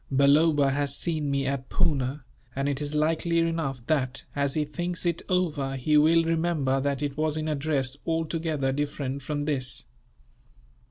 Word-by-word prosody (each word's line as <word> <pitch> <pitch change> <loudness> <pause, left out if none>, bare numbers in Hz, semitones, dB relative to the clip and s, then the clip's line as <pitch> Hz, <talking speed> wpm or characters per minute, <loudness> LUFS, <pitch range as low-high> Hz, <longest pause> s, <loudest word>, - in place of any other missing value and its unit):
Balloba 140 +1 +4
has 140 0 -1
seen 155 -4 -1
me 140 -1 0
at 135 -1 -3
Poona, 135 -2 0 0.3
and 135 +1 -1
it 145 0 -1
is 145 +1 -2
likely 165 +2 +1
enough 165 -7 -1
that, 135 -3 0
as 140 -1 0
he 155 -1 +1
thinks 175 +4 -3
it 170 -1 0
over, 155 -7 0
he 145 +4 +1
will 160 +3 +5
remember 160 -5 +1
that 140 0 -1
it 145 -1 -2
was 155 0 0
in 155 0 -2
a 155 - +1
dress 140 -2 -1
altogether 160 -4 -1
different 140 -1 -3
from 145 +2 -3
this. 135 -2 -1
145 Hz, 165 wpm, -27 LUFS, 135-160 Hz, 0.3 s, will